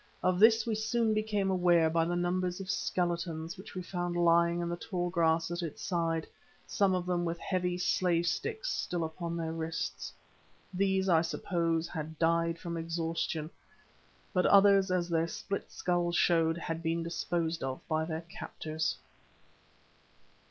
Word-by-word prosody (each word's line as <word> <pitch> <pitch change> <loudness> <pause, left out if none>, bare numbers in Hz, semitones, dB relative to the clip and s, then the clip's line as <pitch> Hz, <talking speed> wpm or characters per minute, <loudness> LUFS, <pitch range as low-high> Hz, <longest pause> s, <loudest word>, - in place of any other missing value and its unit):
Of 185 -1 +2
this 220 +1 +6
we 230 - -1
soon 220 +1 +1
became 210 -2 0
aware 175 -3 +4
by 165 +1 +2
the 175 +1 -1
numbers 180 +1 -1
of 195 +1 -3
skeletons 170 -4 -2
which 190 -1 -11
we 185 - -4
found 175 -1 -3
lying 170 0 +4
in 170 - -2
the 170 - -2
tall 175 -1 -3
grass 165 -1 +2
at 175 +1 -2
its 165 -4 -6
side, 165 -3 0 0.4
some 195 -2 +2
of 180 -1 -2
them 180 -1 0
with 170 0 -2
heavy 180 0 -1
slave 175 -1 +1
sticks 445 - -2
still 175 -2 -2
upon 170 +1 -4
their 165 -1 -2
wrists. 165 0 -4 0.6
These, 190 0 +1
I 165 -3 +5
suppose, 165 -1 -1
had 160 -1 -6
died 165 +1 +2
from 170 0 -5
exhaustion, 165 -1 -2 0.8
but 180 -2 +3
others, 200 -1 +6
as 180 -1 +1
their 165 -1 +1
split 200 +3 -5
skulls 175 -1 0
showed 165 -2 +3
had 165 -1 -4
been 165 0 -1
disposed 170 -1 -2
of 130 -1 -3
by 160 -1 +1
their 160 0 -3
captors. 160 -2 -4
170 Hz, 160 wpm, -31 LUFS, 165-185 Hz, 0.8 s, this